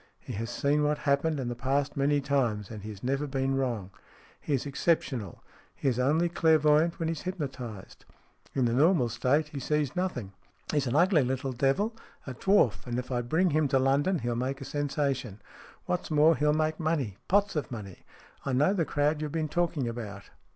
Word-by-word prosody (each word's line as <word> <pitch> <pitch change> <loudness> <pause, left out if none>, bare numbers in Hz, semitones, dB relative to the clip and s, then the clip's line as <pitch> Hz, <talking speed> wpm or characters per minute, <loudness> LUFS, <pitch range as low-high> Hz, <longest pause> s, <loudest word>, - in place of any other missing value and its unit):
He - - -8
has 115 +3 -4
seen 145 +1 +1
what 150 0 +1
happened 145 +1 +1
in 130 - -3
the 120 - -2
past 135 +3 -1
many 145 +1 +2
times, 120 -8 0
and 110 -2 -7
he 105 - -7
has 100 -2 -9
never 135 +3 0
been 135 0 -1
wrong. 120 -8 -2 0.5
He 145 - -1
is 130 - -3
exceptional. 135 - -1 0.3
He - - -3
is 125 -2 +1
only 155 +7 +3
clairvoyant 160 -1 +3
when 165 -3 -2
he - - 0
is 165 - -5
hypnotized. 130 - -6 0.5
In 130 -2 +2
the 115 - +1
normal 145 -1 +4
state 140 +6 +1
he 145 - -6
sees 150 0 -1
nothing. 135 - -3 0.4
He's 145 -3 +1
an 120 - -1
ugly 170 0 +5
little 130 +1 -2
devil, 140 - +1 0.3
a 130 - -5
dwarf, 130 - +2
and 120 0 -2
if 125 +1 -4
I 120 -1 0
bring 160 +9 +1
him 155 0 +2
to 135 - +2
London 140 +8 +2
he'll 120 -4 -2
make 130 +3 -2
a 135 - -7
sensation. 135 -7 -2 0.5
What's 180 - -2
more, 155 +1 +5
he'll 150 0 +2
make 155 +1 0
money. 150 - -1
Pots 200 0 +2
of 150 -5 -2
money. 100 -6 -8 0.4
I 135 - -2
know 150 +9 +3
the 175 -5 +1
crowd 150 +1 0
you've 150 -1 -3
been 155 -1 -2
talking 165 -6 0
about. 105 -4 -7
140 Hz, 200 wpm, -29 LUFS, 125-155 Hz, 0.5 s, ugly